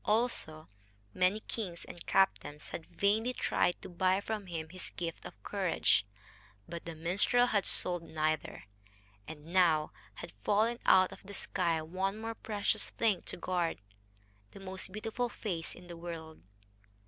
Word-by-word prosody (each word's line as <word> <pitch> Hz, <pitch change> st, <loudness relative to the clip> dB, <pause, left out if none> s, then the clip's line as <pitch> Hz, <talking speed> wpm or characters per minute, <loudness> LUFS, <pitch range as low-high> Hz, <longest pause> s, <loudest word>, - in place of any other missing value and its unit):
Also, 210 Hz, -9 st, 0 dB, 0.5 s
many 185 Hz, +4 st, +2 dB
kings 185 Hz, -8 st, -5 dB
and 175 Hz, -, -10 dB
captains 150 Hz, -6 st, +2 dB
had 160 Hz, -, -6 dB
vainly 220 Hz, +5 st, +2 dB
tried 175 Hz, -, +1 dB
to -, -, -6 dB
buy 185 Hz, +2 st, +2 dB
from 210 Hz, -1 st, -4 dB
him 160 Hz, -2 st, -4 dB
his 185 Hz, +2 st, -6 dB
gift 165 Hz, -2 st, -5 dB
of 100 Hz, -, -10 dB
courage. 170 Hz, -, +2 dB, 0.6 s
But 170 Hz, 0 st, -6 dB
the 165 Hz, -1 st, -5 dB
minstrel 190 Hz, +9 st, +4 dB
had 205 Hz, -5 st, +2 dB
sold 175 Hz, -1 st, +2 dB
neither. 155 Hz, -2 st, -1 dB, 0.6 s
And 150 Hz, -2 st, -9 dB
now 165 Hz, -5 st, +4 dB, 0.2 s
had -, -, -8 dB
fallen 225 Hz, +4 st, +3 dB
out 185 Hz, -1 st, +7 dB
of -, -, -11 dB
the 200 Hz, +1 st, -8 dB
sky 170 Hz, -4 st, 0 dB
one 190 Hz, +5 st, -1 dB
more 225 Hz, +1 st, -3 dB
precious 210 Hz, -2 st, -1 dB
thing 215 Hz, -6 st, +1 dB
to -, -, -4 dB
guard 175 Hz, -1 st, 0 dB, 0.8 s
the -, -, -10 dB
most 190 Hz, 0 st, -5 dB
beautiful 225 Hz, +4 st, -2 dB
face 175 Hz, -8 st, -4 dB
in 180 Hz, -, -13 dB
the 175 Hz, -1 st, -8 dB
world. 165 Hz, -2 st, -7 dB
185 Hz, 150 wpm, -33 LUFS, 165-205 Hz, 0.8 s, out